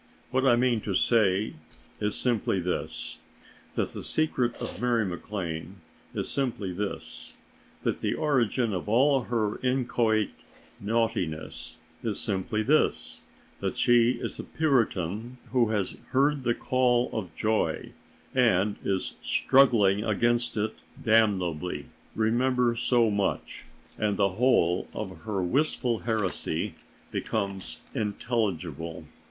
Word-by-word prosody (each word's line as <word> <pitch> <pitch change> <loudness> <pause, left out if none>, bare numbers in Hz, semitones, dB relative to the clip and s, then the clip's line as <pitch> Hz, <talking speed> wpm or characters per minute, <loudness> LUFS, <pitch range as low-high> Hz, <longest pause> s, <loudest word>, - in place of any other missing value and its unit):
What 130 +1 +2
I 120 - +6
mean 120 -2 +2
to 100 -2 -2
say 105 -2 +3 0.5
is 105 0 -1
simply 115 -6 +1
this: 90 0 -3 0.6
that - - 0
the - - -6
secret 130 -6 0
of - - -6
Mary 120 -3 +2
MacLane 90 -1 -4 0.4
is - - -2
simply 115 -9 -2
this: 100 +2 -5 0.5
that - - -1
the - - 0
origin 125 -6 +1
of 95 +2 -3
all 130 +2 +4
her 110 -3 -1
inchoate 120 -4 +1 0.5
naughtiness 110 -7 -2 0.2
is 110 -4 -2
simply 105 +2 -1
this: 150 +7 +1 0.4
that - - -2
she 120 0 +5
is - - -5
a - - -3
Puritan 115 - 0
who 120 -3 +3
has 105 -4 -1
heard 140 0 +2
the 120 0 +2
call 125 -1 +2
of 95 -7 -4
joy 110 0 0 0.4
and 105 -5 +3
is 95 -2 -1
struggling 110 -7 +4
against 120 +2 +1
it 110 +1 -1 0.2
damnably. 95 -7 +2 0.3
Remember 120 +2 +2
so 115 -1 +3
much, 100 -5 -2 0.3
and 105 -2 +1
the 100 -1 +3
whole 95 -5 +2
of 95 -3 -6
her 100 -4 -1
wistful 125 - +1
heresy 110 -5 -1 0.4
becomes 100 -3 -3 0.2
intelligible. 95 - -2
110 Hz, 120 wpm, -28 LUFS, 100-125 Hz, 0.6 s, I